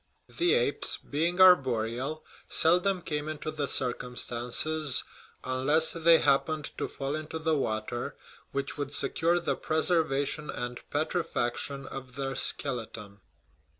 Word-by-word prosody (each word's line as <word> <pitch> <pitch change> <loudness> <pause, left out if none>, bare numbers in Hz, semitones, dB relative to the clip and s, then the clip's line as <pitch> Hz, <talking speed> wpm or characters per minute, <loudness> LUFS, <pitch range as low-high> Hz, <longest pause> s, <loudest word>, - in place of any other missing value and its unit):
The 350 +5 +4
apes, 485 - +1
being 170 +5 -2
arboreal, 135 -4 +3 0.2
seldom 180 +2 +3
came 150 0 -3
into 155 0 -5
the 150 -2 -3
circumstances 125 +3 +2 0.4
(unless 140 +5 +3
they 165 0 +5
happened 150 +2 0
to - - -2
fall 135 0 -5
into 155 +1 -5
the 160 0 0
water) 120 -2 -3 0.4
which 140 +1 -4
would 145 -1 -3
secure 170 +3 +1
the 170 - -1
preserva 155 -3 +1
tion 150 +2 -5
and 120 0 -5
petrifaction 140 -4 -2
of 130 -1 -9
their 135 -1 -4
skeleton. 115 -7 -2
145 Hz, 120 wpm, -28 LUFS, 130-160 Hz, 0.4 s, they